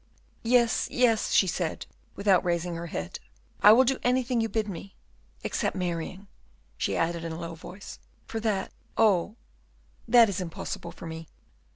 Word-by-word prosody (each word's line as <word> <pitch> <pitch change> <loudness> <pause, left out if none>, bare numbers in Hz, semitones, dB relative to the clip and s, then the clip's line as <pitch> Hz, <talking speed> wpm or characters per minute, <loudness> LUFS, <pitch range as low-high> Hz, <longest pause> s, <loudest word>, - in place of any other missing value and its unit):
"Yes, 235 0 +3
yes," 240 -3 +2
she - - +5
said, 175 -2 -2 0.3
without 200 -2 +3
raising 175 0 -1
her 170 +1 -5
head, 85 - -5 0.4
"I 205 - +9
will 245 +4 +7
do 265 +1 0
anything 250 -1 +1
you 225 - -1
bid 215 +1 -1
me, 195 0 -8 0.5
except - - -1
marrying," 180 +1 -3 0.5
she - - -1
added, 165 0 0
in 165 -1 -4
a 160 - -6
low 165 -1 -5
voice, 185 +4 -10 0.3
"for 225 - -4
that, 210 -4 -1 0.3
oh! 210 -2 +3 0.7
that 235 0 +7
is 195 -2 -2
impossible 165 -2 -5
for - - -11
me." 160 0 -7
195 Hz, 160 wpm, -27 LUFS, 170-225 Hz, 0.7 s, I